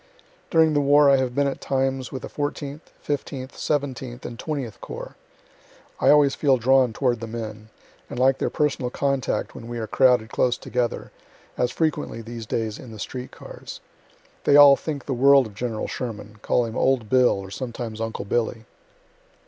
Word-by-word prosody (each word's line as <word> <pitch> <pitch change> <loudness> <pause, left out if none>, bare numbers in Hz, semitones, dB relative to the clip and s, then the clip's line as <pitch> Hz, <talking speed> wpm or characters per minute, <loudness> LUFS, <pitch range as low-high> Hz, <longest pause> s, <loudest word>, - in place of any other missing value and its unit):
During 160 -2 +4
the 145 - +3
war 145 0 +5
I 135 - +5
have 130 -2 -1
been 140 - +2
at 140 - -3
times 135 -1 -1
with 130 -3 -6
the - - -4
Fourteenth, 145 +1 -5
Fifteenth, 135 -2 -4
Seventeenth, 130 -4 -3
and 120 - -7
Twentieth 135 -9 -4
Corps. - - -8 0.8
I - - +3
always 145 -2 +6
feel 135 -3 +3
drawn 130 +1 +4
toward 120 0 0
the 115 - -6
men, 110 -1 -7 0.4
and - - -7
like 130 +1 +3
their - - 0
personal 140 -4 0
contact 140 0 -1
when 115 - -9
we 120 0 -5
are 115 - -3
crowded 125 -2 +3
close 125 +1 +1
together, 125 -2 -3 0.4
as 125 - +1
frequently 155 -7 -2
these 115 -1 -8
days 110 -1 -2
in 125 - -10
the 110 - -9
street 125 +4 -6
cars. - - -10 0.7
They 145 - +5
all 145 -1 +9
think 145 -1 -5
the 135 - -2
world 135 +1 +6
of 110 - -10
General 115 +1 -3
Sherman; 110 -3 -6
call 120 - +1
him 115 0 -6
"old 130 -5 +1
Bill," 125 -1 +4
or 95 -1 -9
sometimes 115 -2 -5
"uncle 115 -2 -4
Billy." 115 +1 -1
125 Hz, 180 wpm, -24 LUFS, 115-140 Hz, 0.8 s, all